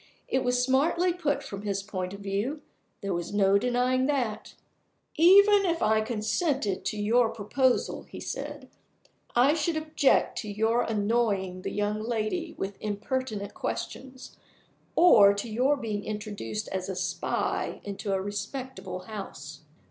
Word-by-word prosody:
It 260 - 0
was 250 0 +2
smartly 335 +7 +2
put 290 -5 -1
from 200 -6 -7
his 200 -1 -2
point 185 -3 -4
of 200 +1 -9
view 205 +10 -2 0.4
there 200 -1 -2
was 170 0 -3
no 200 0 +4
denying 250 +2 +1
that. 255 -7 -2 0.6
"Even 400 +5 +7
if 340 -3 0
I 220 0 +3
consented 220 - -1
to 215 - -2
your 225 +3 +3
proposal," 245 +4 0
he - - -8
said, - - -6 0.7
"I 255 +5 +5
should 325 0 0
object 310 -3 +2
to 210 - -5
your 220 +3 +2
annoying 205 -4 0
the - - -3
young 210 +1 -1
lady 235 +9 -2
with 195 0 -4
impertinent 215 0 -3
questions, 260 0 -6 0.6
or 210 - +7
to 200 +3 -4
your 255 +6 +2
being 215 -5 -3
introduced 210 0 -5
as 190 0 -3
a 190 - -3
spy 180 -1 -2
into 200 0 -4
a 195 - +1
respectable 205 -2 -5
house." 185 -8 -8
220 Hz, 140 wpm, -28 LUFS, 200-265 Hz, 0.7 s, Even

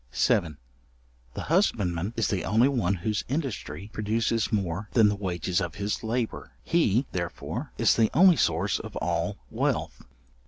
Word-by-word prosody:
§7. 80 -7 +1 0.8
The - - -4
husbandman 105 - 0
is 115 - +2
the 95 -6 -1
only 110 +6 +3
one 115 -9 +1
whose 105 +4 -2
industry 130 -7 -4
produces 110 +1 0
more 100 -1 -2
than 110 -3 +5
the 105 - 0
wages 90 -2 -1
of 85 -2 -4
his 100 +2 -3
labour. 115 +1 -3
He, 135 - +2
therefore, 85 -2 -4
is - - +4
the 110 -2 +3
only 180 +3 +6
source 90 - +1
of - - -9
all 85 +4 -1
Wealth. - - -1
105 Hz, 150 wpm, -27 LUFS, 90-115 Hz, 0.8 s, only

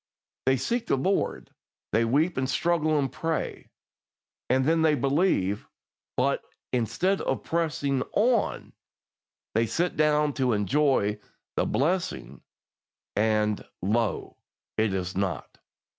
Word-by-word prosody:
They 135 0 +4
seek 230 - -1
the - - +3
Lord, 190 +9 -1 0.4
they 115 +2 +3
weep 150 +9 +2
and 130 0 -1
struggle 155 0 +2
and 135 -2 0
pray, 165 -1 -3 0.8
and 130 +1 +3
then 160 +2 +3
they 155 -2 +4
believe; 135 - +1 0.5
but, - - +2 0.3
instead 180 - +1
of - - -1
pressing 150 -5 0
on, 230 +1 +1 0.8
they 115 +1 +2
sit 175 +7 0
down 150 -1 +3
to 125 -2 +3
enjoy 105 -1 +2 0.4
the - - +1
blessing, 170 +7 -1 0.7
and, 105 -1 +1 0.2
lo! 110 +2 0 0.4
it 110 -2 +2
is 95 -1 -3
not. 95 -2 -3
135 Hz, 115 wpm, -27 LUFS, 110-160 Hz, 0.8 s, They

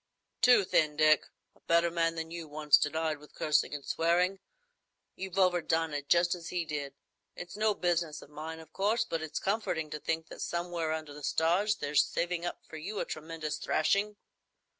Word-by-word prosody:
"Too 245 -4 +7
thin, 155 -4 +2
Dick. 155 0 +4 0.3
A - - -25
better 170 0 +2
man 165 -1 +1
than 160 0 -5
you 170 -1 -6
once 150 -1 +4
denied 155 0 -1
with 150 - -17
cursing 150 -1 +1
and 140 - -7
swearing. 180 +4 +2 0.8
You've 190 -1 -6
overdone 170 -4 +2
it, 145 -1 -4
just 175 0 +4
as 170 -2 -7
he 175 -2 -2
did. 145 -3 -4 0.4
It's 180 -1 -8
no 215 0 +2
business 170 -3 -1
of 145 - -17
mine, 160 +2 -6
of 160 0 -14
course, 220 +4 +1
but 165 -7 -3
it's 160 -1 -5
comforting 190 -7 -1
to 150 - -4
think 160 +1 -2
that - - -9
somewhere 170 -2 -2
under 155 -2 -4
the 150 - -10
stars 175 +8 +2
there's 145 -7 +2
saving 175 0 -2
up - - -6
for 160 - -8
you 200 +7 -5
a - - -1
tremendous 155 -1 -5
thrashing. 200 +6 +1
165 Hz, 185 wpm, -31 LUFS, 155-180 Hz, 0.8 s, Too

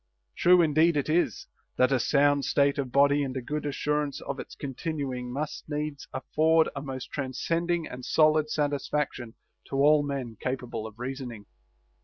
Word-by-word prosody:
True 180 0 +5
indeed 160 +1 +3
it 145 - -1
is, 170 +3 +1 0.2
" - - -45
that 130 +1 +4
a 135 - +3
sound 145 +2 +3
state 140 0 +2
of 130 -3 -2
body 140 +2 +4
and 135 -1 -3
a - - 0
good 150 +3 -3
assurance 150 0 -1
of 140 -1 -5
its - - -8
continuing 135 -3 -4
must 145 +3 -5
needs 150 -1 -4
afford 160 +1 +2
a 140 - -4
most 135 -3 -6
transcending 165 +5 -1
and 125 0 -8
solid 155 +1 +3
satisfaction 145 -5 -2 0.3
to - - -5
all 145 +2 +5
men 135 -6 -4
capable 125 -4 -3
of 110 0 -13
reasoning." 125 -4 -6
140 Hz, 165 wpm, -27 LUFS, 130-150 Hz, 0.3 s, True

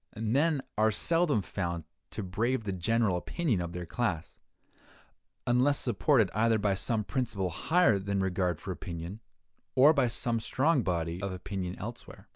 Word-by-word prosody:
Men 135 +7 +1 0.2
are 110 0 +5
seldom 155 - +2
found 85 -2 -3 0.3
to 110 - -5
brave 115 +7 -1
the 100 - -3
general 100 +1 +1
opinion 120 - -1
of 85 -1 -4
their 90 0 -5
class, 90 -5 -3 1.1
unless 125 +4 +3
supported 120 - +2
either 110 +1 +3
by 100 -2 +1
some 105 +3 0
principle 105 -7 -2
higher 160 - +3
than 100 0 -2
regard 90 -3 0
for 95 - -5
opinion, 85 +2 -6 0.6
or 140 +4 +7
by 135 -5 +2
some 115 0 0
strong 135 +5 +2
body 85 -2 -2
of 100 -1 -2
opinion 90 0 -4
elsewhere. 120 +3 -9
105 Hz, 150 wpm, -30 LUFS, 90-125 Hz, 1.1 s, or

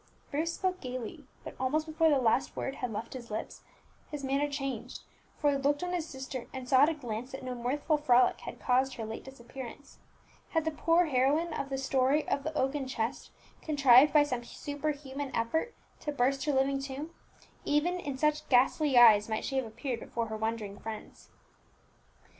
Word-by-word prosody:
Bruce 325 +3 -1
spoke 370 -1 -1
gaily, 255 +3 -6 0.2
but - - -7
almost 300 +4 0
before 320 +1 +2
the 290 - +4
last 250 +1 +1
word 270 - -3
had 250 -2 -3
left 215 +2 -5
his 245 -3 -8
lips 215 - -5 0.5
his 295 -2 -6
manner 275 +2 +1
changed, 275 -2 -5 0.3
for 290 -2 +2
he 280 - +1
looked 285 +3 +1
on 360 0 -2
his 330 -3 -2
sister, 265 -2 -6
and 260 -1 -7
saw 260 +1 +5
at 295 - +6
a 325 - -2
glance 245 -2 -5
that 265 - -6
no 255 -1 -4
mirthful 280 +6 0
frolic 255 -4 +4
had - - -8
caused 260 +1 +2
her 225 - -5
late 220 +1 -6
disappearance. 265 +1 -10 0.5
Had 325 -2 0
the 320 - +1
poor 330 +3 +3
heroine 300 +4 +2
of 275 - -3
the 270 - -2
story 270 +2 +1
of 280 - 0
the 310 +1 -3
oaken 270 0 0
chest 235 -2 -3 0.3
contrived 280 -2 +6
by 295 0 +6
some 250 -4 -3
superhuman 285 0 -4
effort 320 - -1 0.2
to 295 - -3
burst 270 0 +1
her 300 - +2
living 275 0 +2
tomb, 275 +4 -6 0.5
even 340 +5 +1
in 280 -6 -4
such 300 +1 0
ghastly 270 +3 +3
guise 225 -4 +7
might 220 - -2
she 270 - -2
have 260 -3 0
appeared 240 +2 -4
before 230 -1 -4
her 220 - -3
wondering 220 -2 -3
friends. 220 -1 -8
270 Hz, 190 wpm, -30 LUFS, 250-295 Hz, 0.5 s, guise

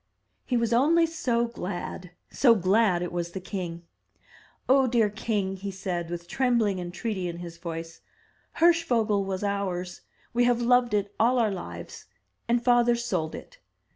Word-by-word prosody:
He 250 - +1
was 235 -1 +1
only 320 +8 +4
so 250 -8 0
glad 180 -5 -6
— - - -48
so 240 -4 +5
glad 190 -2 +2
it 175 - -4
was 170 -1 -3
the 190 - -4
king. 180 -3 -5 0.8
"Oh, 265 0 +5
dear 230 -4 +2
king!" 205 -3 -2
he 200 +1 -5
said, 180 -3 -4
with 170 0 -6
trembling 230 -4 +1
entreaty 180 +2 -3
in 170 -1 -5
his 170 -1 -9
voice, 165 -1 -7 0.5
"Hirschvogel 240 -12 +3
was 190 0 -3
ours. 190 -3 -3 0.3
We 240 +1 +3
have 245 -1 +3
loved 240 -2 +3
it 205 0 -1
all 245 +3 +4
our 225 -3 +2
lives; 85 - -8 0.4
and 235 0 +1
father 240 -1 +4
sold 185 -10 -2
it. - - -12
205 Hz, 160 wpm, -27 LUFS, 180-240 Hz, 0.8 s, so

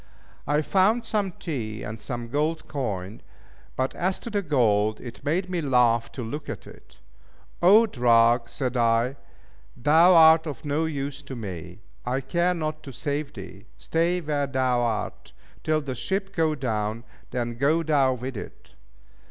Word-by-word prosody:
I 150 +1 +2
found 205 +8 +2
some 205 -3 -1
tea 110 -12 -5
and 110 +1 -7
some 120 -2 -5
gold 155 +4 -1
coin; 105 -8 -4 0.5
but 130 +1 -1
as 185 +2 -1
to 235 - -7
the 205 -1 0
gold, 110 - +2
it 120 +1 -10
made 170 +6 0
me 180 -2 -2
laugh 120 -5 +2
to 125 - -5
look 145 +6 -6
at - - -6
it. - - -16 0.6
"O 205 +6 +7
drug!" 120 - +3
said 130 -3 -3
I, 115 +2 +2 0.6
"Thou 165 +7 +5
art 160 0 +7
of 145 -2 -7
no 150 +3 0
use 140 -2 -4
to 140 -2 -8
me! 90 -4 -7 0.2
I 125 +2 -1
care 170 +6 0
not 155 -2 -3
to 135 - -9
save 140 +4 -3
thee. 100 +1 -11
Stay 170 +2 0
where 145 -3 -1
thou 130 -2 +1
art, 110 -4 -3 0.3
till 155 0 +1
the 140 -3 -4
ship 195 - -3
go 160 -2 +2
down, 110 -4 -2 0.3
then 120 -1 -3
go 150 +7 +2
thou 140 -4 +3
with 125 +1 -6
it!" - - -10
135 Hz, 160 wpm, -25 LUFS, 115-160 Hz, 0.6 s, O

